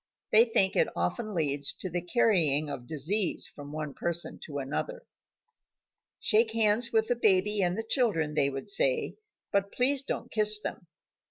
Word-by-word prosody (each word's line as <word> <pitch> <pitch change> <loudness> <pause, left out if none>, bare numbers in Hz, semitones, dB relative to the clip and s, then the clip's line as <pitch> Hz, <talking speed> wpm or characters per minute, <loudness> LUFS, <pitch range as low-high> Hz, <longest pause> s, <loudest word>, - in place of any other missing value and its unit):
They 225 +2 +6
think 195 -5 +1
that - - +2
it - - -11
often 190 - -3
leads 145 -3 0
to - - -7
the 175 0 -4
carrying 165 - +2
of 120 -3 -8
disease 165 - 0
from 145 0 -11
one 150 -2 -6
person 170 0 -2
to 145 -3 -7
another. 150 - -5 1.2
"Shake 220 0 +2
hands 225 +1 +3
with 220 -1 +1
the 245 - +1
baby 210 -2 +1
and 180 +1 -1
the 225 - -4
children," 190 - +1
they 140 -2 +1
would 135 - -3
say, - - +1 0.3
"but 200 -1 -1
please 265 +2 +2
don't 275 - -6
kiss 215 -1 +4
them." 175 - -8
200 Hz, 170 wpm, -28 LUFS, 155-225 Hz, 1.2 s, They